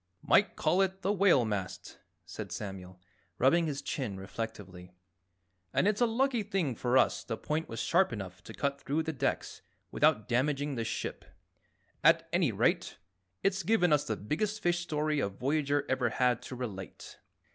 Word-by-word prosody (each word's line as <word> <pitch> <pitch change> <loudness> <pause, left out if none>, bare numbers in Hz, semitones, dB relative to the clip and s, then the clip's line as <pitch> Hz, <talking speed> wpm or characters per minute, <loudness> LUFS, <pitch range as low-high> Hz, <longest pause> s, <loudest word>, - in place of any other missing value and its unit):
"Might - - +4
call 185 - +2
it 190 0 -1
the 195 +3 +2
whalemast," 120 - +1 0.3
said - - -7
Samuel, 95 -2 -7 0.4
rubbing 165 +6 +4
his 145 -1 -4
chin 125 -9 -3
reflectively. 95 -3 -7 0.8
"And 190 - +3
it's 210 +2 +1
a 240 - +5
lucky 245 +1 +1
thing 195 -9 -1
for 125 +3 +1
us - - +3
the 115 - -4
point 155 +6 -2
was 115 - -5
sharp 185 -1 +3
enough 95 -5 -7
to - - -9
cut 140 0 -2
through 150 +4 -1
the 160 - -3
decks 135 - -2 0.3
without 105 0 +2
damaging 140 +3 0
the 115 -3 -2
ship. 115 - -4 0.8
At - - +5
any - - +3
rate, - - 0 0.5
it's 195 -1 +1
given 180 -3 +3
us 145 - +3
the 110 - -2
biggest 200 - -2
fish 175 0 +2
story 155 -3 -1
a 100 - 0
voyager 140 +6 0
ever 130 -2 +1
had 125 0 +1
to 130 - -6
relate. 105 -7 -7
140 Hz, 165 wpm, -31 LUFS, 115-175 Hz, 0.8 s, a